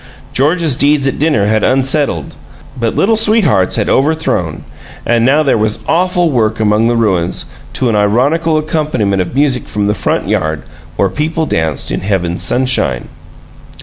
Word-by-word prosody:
George's 155 +1 +1
deeds 145 +1 +2
at 135 - -2
dinner 145 -9 +1
had 110 0 +1
unsettled, 135 - +1 0.4
but 115 -3 -2
Little 220 +3 +2
Sweethearts 210 - +3
had - - -1
overthrown 135 - 0 0.4
and 120 -1 +2
now 145 +5 +3
there 135 -6 +1
was 110 +1 -1
awful 175 -1 +1
work 110 -4 0
among 110 +1 +2
the 120 - +1
ruins, 95 -7 0 0.3
to 130 - 0
an 115 - +1
ironical 140 +11 +1
accompaniment 150 -11 -1
of 90 +7 -5
music 135 -3 0
from 105 -1 -2
the 105 - +1
front - - -2
yard, 80 -7 -1 0.3
where 100 - +1
people 155 - -2
danced 80 - -2
in - - -1
heaven's 90 -3 -2
sunshine! 125 - 0
120 Hz, 155 wpm, -13 LUFS, 105-150 Hz, 0.4 s, Sweethearts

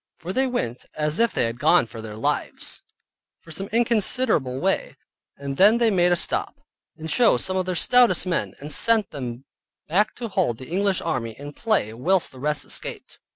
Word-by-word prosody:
For 180 +3 -6
they 265 +3 +1
went 125 - -3
as 150 +3 -1
if 235 0 +3
they - - 0
had 115 +1 -3
gone - - +4
for 115 0 -10
their 110 -1 -8
lives, 110 - -3 0.6
for 165 - -15
some 195 +5 -6
considerable 225 - +1
way, 190 +4 -1 0.4
and 140 -1 -6
then 210 +4 +6
they 235 -2 +3
made 180 -2 +3
a - - +4
stop, - - -1 0.4
and 160 0 -7
chose 235 +7 +3
some 185 - -1
of 185 -1 -1
their 185 - -2
stoutest 245 +7 +4
men, 180 -2 -2
and 145 +2 -7
sent 225 +1 +3
them 125 -1 -6 0.4
back 205 +7 +1
to 240 - -5
hold 185 - -1
the 130 - -11
English 195 +1 0
army 115 -3 -3
in 145 +1 -9
play 205 - 0
whilst 175 +10 0
the 130 - -13
rest 150 0 0
escaped. - - -4
175 Hz, 195 wpm, -23 LUFS, 135-215 Hz, 0.6 s, then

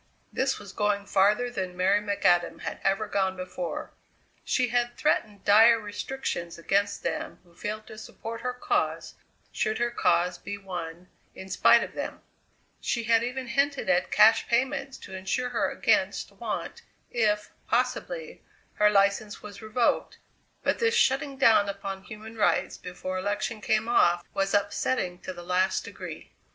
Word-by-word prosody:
This 265 +1 0
was 200 -2 -11
going 205 -1 0
farther 205 +5 +3
than 185 -5 -4
Mary 195 +3 +3
McAdam 180 -4 +1
had - - -5
ever 195 +2 +1
gone 190 -2 0
before. 185 -1 -5 0.5
She 250 -2 +1
had 240 0 0
threatened 210 -9 0
dire 225 +3 +7
restrictions 205 -4 -4
against 200 +4 0
them - - -3
who 175 -1 -24
failed 215 +4 -5
to 215 - -10
support 230 +1 -7
her 250 - -1
cause 250 - -1 0.4
should 215 0 -1
her 240 0 0
cause 180 -4 +1
be 205 0 -6
won 175 -3 -7 0.3
in 190 - -9
spite 190 - +5
of - - -7
them; - - -5 0.6
she 235 - -1
had 225 0 +4
even 250 +2 -3
hinted 280 +4 +1
at 270 -1 +2
cash 215 +2 +5
payments 270 +3 0
to - - -11
insure 220 +7 -2
her - - 0
against - - +1
want - - -5 0.3
if, 210 -3 +1 0.2
possibly, - - -1 0.4
her 210 0 +5
license 200 +1 +1
was 210 0 -9
revoked, 225 +2 0 0.5
but - - +1
this 460 0 +2
shutting 270 - +2
down 225 -6 +5
upon 195 -1 -5
human 220 +2 -10
rights 210 -2 +1
before 185 +1 -5
election 210 +3 -2
came 220 +2 +1
off 175 -7 +3
was 195 +1 0
upsetting 200 -2 0
to - - -6
the 175 -1 -9
last 185 +1 +1
degree. - - -9
210 Hz, 155 wpm, -27 LUFS, 190-235 Hz, 0.6 s, dire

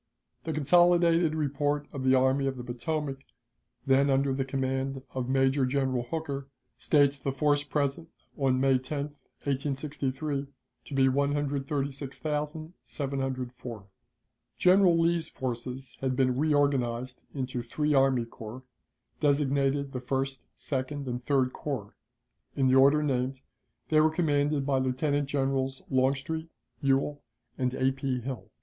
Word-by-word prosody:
The 160 - -2
consolidated 170 +1 +4
report 145 -1 0
of 135 -2 -4
the 130 0 +5
Army 130 +1 +3
of 135 -1 -2
the 125 - -6
Potomac, 135 +3 -3 0.7
then 135 +1 +4
under 135 0 +2
the 135 0 0
command 135 0 -2
of 130 -1 -3
Major 135 +1 +3
General 130 -1 +1
Hooker, 140 +1 -4 0.3
states 145 -2 +3
the 135 - -2
force 145 +1 +2
present 145 +3 -2 0.3
on 135 -3 +1
May 135 -1 +4
10, 140 +2 -4 0.3
1863, 140 0 -2 0.4
to - - -9
be 135 -1 +5
136,704. 140 - -3 0.7
General 180 -2 +5
Lee's 170 0 +1
forces 130 +1 -5
had 130 -1 0
been 130 -1 +2
reorganized 130 -4 +1
into 130 -2 -2
three 150 +6 -1
army 135 -3 +3
corps, 115 +2 -9 0.6
designated 140 -1 +1
the 130 - -4
First, 135 0 -3
Second, 140 +1 -3
and 125 0 -3
Third 130 -2 +1
Corps. 130 -9 -4 0.6
In 135 -1 +2
the 130 - +4
order 140 +3 +6
named, 130 -1 -1 0.5
they 155 -1 +5
were 155 - +5
commanded 145 -3 +1
by 135 -2 +2
Lieutenant 135 +2 0
Generals 135 -1 -1
Longstreet, 135 +5 0 0.3
Ewell, 140 +1 +1 0.3
and 125 -1 0
A. 130 0 +2
P. 135 -1 -2
Hill. 130 -1 -6
135 Hz, 130 wpm, -29 LUFS, 130-145 Hz, 0.7 s, order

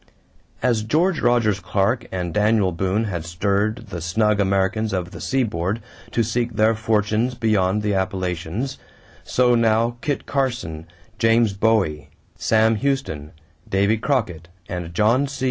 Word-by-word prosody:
= - - -27
As 115 -3 +1
George 160 - +1
Rogers 120 -5 +2
Clark 100 +6 0
and 90 -3 -3
Daniel 105 -1 +3
Boone 95 +5 0
had 95 -7 -3
stirred 100 +5 -1
the 85 - -5
snug 105 +5 +1
Americans 100 +2 +1
of 90 -2 -2
the - - -9
seaboard 110 -6 -1 0.3
to 115 - +1
seek 120 +2 -1
their 110 +1 +4
fortunes 110 +2 0
beyond 105 -3 +1
the 105 -1 0
Appalachians, 95 +6 -2 0.4
so 125 -1 +2
now 115 0 +2
Kit 145 -2 -2
Carson, 120 - -2 0.3
James 115 -2 +3
Bowie, 95 -9 +1 0.3
Sam 110 0 +2
Houston, 110 - -2 0.4
Davy 100 +3 +2
Crockett, 110 - -1 0.2
and 90 -2 -5
John 115 +10 +2
C. 135 - -8
105 Hz, 140 wpm, -22 LUFS, 95-115 Hz, 0.4 s, their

